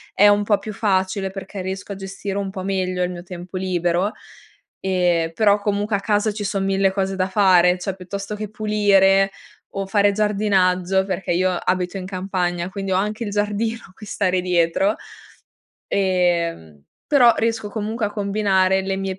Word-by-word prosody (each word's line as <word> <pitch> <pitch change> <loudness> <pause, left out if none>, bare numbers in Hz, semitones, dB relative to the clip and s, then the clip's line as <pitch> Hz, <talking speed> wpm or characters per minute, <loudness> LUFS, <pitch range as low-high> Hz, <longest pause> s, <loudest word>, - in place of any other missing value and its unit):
è 205 - +6
un 205 0 +3
po' 205 0 +2
più 215 - -7
facile, 190 -2 0
perché 195 0 -7
riesco 190 +2 -5
a - - -4
gestire 195 +1 -5
un 195 -1 -3
po' 190 -1 -6
meglio 185 -1 -1
il 180 - -1
mio 175 -1 -7
tempo 180 +1 -10
libero. 180 +2 0 0.7
Ehm, 175 -3 +1
però, 205 +2 +3
comunque 205 +1 -1
a - - 0
casa 210 +1 +1
ci 210 0 -5
son 195 -1 -1
1000 195 0 +2
cose 195 0 -2
da 185 0 0
fare. 185 -3 +4
Cioè 185 +1 -3
piuttosto 195 +3 -6
che 210 0 -5
pulire 200 -2 +3 0.5
o 195 0 -2
fare 205 +1 +3
giardinaggio, 190 -3 +1
perché 190 -2 -2
io 185 +2 +2
abito 180 +1 -1
in 185 - -6
campagna, 180 -2 -2
quindi 195 0 -4
ho - - +2
anche 210 +4 -1
il - - -3
giardino 210 +2 -1
a - - -20
cui 210 +1 -12
stare 185 -3 0
dietro. 180 +3 +1 0.9
Ehm, 170 - 0 0.3
però 245 -5 +6
riesco 225 -2 -1
comunque 215 +1 -3
a - - -5
combinare 200 -2 +1
le 190 0 -2
mie 195 -1 -4
195 Hz, 175 wpm, -21 LUFS, 185-205 Hz, 0.9 s, è